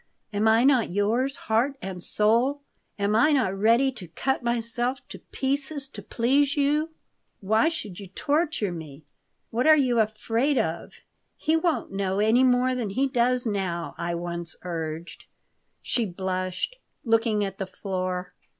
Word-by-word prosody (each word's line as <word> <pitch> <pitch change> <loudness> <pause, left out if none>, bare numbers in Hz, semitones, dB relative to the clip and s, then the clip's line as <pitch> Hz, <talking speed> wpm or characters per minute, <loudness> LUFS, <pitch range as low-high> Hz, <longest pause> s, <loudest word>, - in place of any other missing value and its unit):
Am 210 +2 +2
I 225 +2 +5
not 265 -4 +4
yours, 225 +8 0
heart 245 +6 0
and 185 -2 -6
soul? 235 +10 +2 0.4
Am 205 +1 +1
I 245 +8 +5
not 225 -9 +1
ready 230 +7 +3
to 205 -8 -9
cut 265 +12 -1
myself 240 +2 -2
to - - -8
pieces 275 +1 -2
to - - -9
please 275 +5 +1
you? 295 +3 +2 0.5
Why 220 +9 +3
should 215 - -6
you 200 - -8
torture 290 - 0
me?" 155 -3 -9 0.5
"What 245 +5 +1
are 310 0 +8
you 250 -5 +2
afraid 225 +5 +1
of? 165 -5 -2 0.4
He 315 +1 +1
won't 325 -1 0
know 195 -1 -1
any 220 +5 +4
more 255 0 +3
than 240 -5 -2
he 260 +8 +1
does 250 0 +2
now," 190 -6 -2
I 170 0 -3
once 170 -1 -4
urged. 165 -1 -5 0.6
She 235 -3 0
blushed, 185 - -3 0.3
looking 225 -2 +2
at 195 0 -7
the 195 - -3
floor. 185 -2 -4
225 Hz, 150 wpm, -26 LUFS, 190-265 Hz, 0.6 s, are